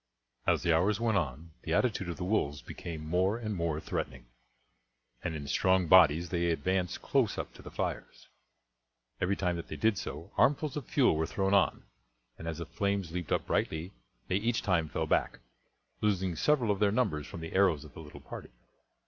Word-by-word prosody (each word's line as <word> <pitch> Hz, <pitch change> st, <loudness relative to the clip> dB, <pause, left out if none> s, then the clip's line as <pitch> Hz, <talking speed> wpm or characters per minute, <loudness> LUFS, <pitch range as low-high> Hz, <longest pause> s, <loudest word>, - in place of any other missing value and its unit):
As -, -, +3 dB
the 85 Hz, -2 st, +4 dB
hours 100 Hz, +5 st, +2 dB
went 110 Hz, -3 st, +2 dB
on 80 Hz, +1 st, -5 dB
the 80 Hz, -, -3 dB
attitude 105 Hz, -7 st, +1 dB
of 85 Hz, -, -4 dB
the 95 Hz, -, -4 dB
wolves 80 Hz, -7 st, 0 dB
became 80 Hz, -4 st, -7 dB
more 90 Hz, +6 st, +1 dB
and 110 Hz, -3 st, -3 dB
more 85 Hz, -4 st, -1 dB
threatening, 65 Hz, -5 st, -4 dB, 1.0 s
and 85 Hz, -3 st, -2 dB
in 75 Hz, -2 st, -5 dB
strong 95 Hz, +5 st, +3 dB
bodies 85 Hz, -1 st, +6 dB
they 85 Hz, -1 st, +1 dB
advanced 90 Hz, +3 st, -1 dB
close -, -, +1 dB
up -, -, -5 dB
to -, -, -13 dB
the -, -, -9 dB
fires. -, -, -4 dB, 0.9 s
Every 95 Hz, +2 st, +2 dB
time 90 Hz, -3 st, -1 dB
that 85 Hz, -, -6 dB
they -, -, -6 dB
did 110 Hz, -2 st, +2 dB
so 75 Hz, +5 st, -7 dB
armfuls 145 Hz, 0 st, +3 dB
of 145 Hz, -5 st, -5 dB
fuel 130 Hz, -, +3 dB
were 80 Hz, +1 st, 0 dB
thrown 95 Hz, 0 st, 0 dB
on, 100 Hz, -, +3 dB, 0.6 s
and 80 Hz, -, -7 dB
as 80 Hz, -2 st, -3 dB
the 85 Hz, -, -5 dB
flames 100 Hz, 0 st, -1 dB
leaped 90 Hz, -2 st, -4 dB
up -, -, +1 dB
brightly 80 Hz, +5 st, -1 dB, 0.3 s
they 95 Hz, -, +1 dB
each 115 Hz, +3 st, 0 dB
time 85 Hz, -6 st, +1 dB
fell -, -, -1 dB
back, -, -, +1 dB, 0.6 s
losing 95 Hz, -4 st, +1 dB
several 125 Hz, -, +2 dB
of 100 Hz, -, -1 dB
their 105 Hz, -1 st, +3 dB
numbers 90 Hz, -11 st, 0 dB
from 85 Hz, -, -8 dB
the 80 Hz, -, -6 dB
arrows 95 Hz, -6 st, +3 dB
of 75 Hz, -, -14 dB
the -, -, -10 dB
little 75 Hz, -2 st, -11 dB
party. -, -, -9 dB
90 Hz, 195 wpm, -31 LUFS, 80-100 Hz, 1.0 s, bodies